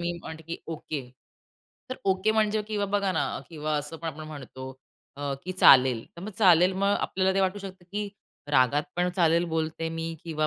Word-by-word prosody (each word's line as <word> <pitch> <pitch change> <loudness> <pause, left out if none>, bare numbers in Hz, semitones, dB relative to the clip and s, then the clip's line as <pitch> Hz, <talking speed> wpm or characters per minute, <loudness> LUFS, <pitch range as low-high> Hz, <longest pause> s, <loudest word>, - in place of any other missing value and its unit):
मी 170 0 -1
म्हणते 160 0 -8
की 165 +2 -5
ओके. 155 -2 -4 0.9
तर 255 - -3
ओके 190 +3 +2
म्हणजे 215 -1 +2
किंवा 210 -2 0
बघा 200 -1 +1
ना 165 - +1 0.2
किंवा 155 -2 -3
असं 150 +2 -4
पण 165 0 -5
आपण 155 0 -7
म्हणतो 130 -3 -8 0.5
अ, 140 -1 -2
की 185 - -3
चालेल. 130 -9 +6
तर - - -9
मग 210 - -5
चालेल, 180 -3 +6
मग 200 +2 +2
आपल्याला 190 0 +1
ते 195 - +2
वाटू 190 +1 +1
शकतं 190 -2 -9
की 210 0 -2 0.4
रागात 135 +1 +4
पण 180 0 +2
चालेल 170 -1 +4
बोलते 160 0 -2
मी 165 0 -4 0.2
किंवा 155 -2 0
165 Hz, 190 wpm, -27 LUFS, 155-190 Hz, 0.9 s, चालेल